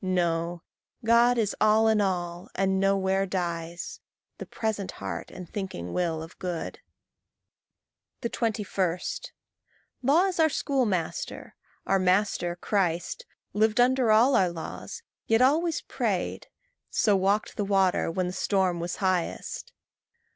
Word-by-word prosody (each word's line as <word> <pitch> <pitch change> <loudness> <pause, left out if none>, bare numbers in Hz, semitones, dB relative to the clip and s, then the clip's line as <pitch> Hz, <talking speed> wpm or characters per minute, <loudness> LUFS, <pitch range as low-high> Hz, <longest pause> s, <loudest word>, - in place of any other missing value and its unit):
No; 170 -2 0 0.4
God 235 +2 +5
is 215 -3 0
all 215 +1 +5
in 220 -1 +4
all, 175 -3 -2
and 190 0 +1
nowhere 195 0 +2
dies 170 -2 -4 0.4
The - - -7
present 215 -3 -3
heart - - -5
and 180 - -9
thinking 160 - -5
will 165 -3 -1
of 165 - -13
good. 175 -3 -4 1.4
21. 210 -6 -1 1.0
Law 290 +8 +4
is 370 -3 -2
our 320 -1 +5
schoolmaster. 210 - -2 0.3
Our 195 - +2
master, 185 -2 +1
Christ, 185 - -1 0.3
Lived 215 +2 +2
under 250 -1 +4
all 240 +5 +5
our 185 -2 +4
laws, 170 -2 -7 0.2
yet 225 0 +4
always 315 +4 +2
prayed - - -2 0.4
So 210 -2 +3
walked 195 +2 +1
the 205 - -1
water 195 -3 +2
when 180 +2 -1
the 180 - -3
storm 190 -2 +1
was 175 +1 -3
highest. 185 -2 -2
195 Hz, 125 wpm, -27 LUFS, 175-220 Hz, 1.4 s, God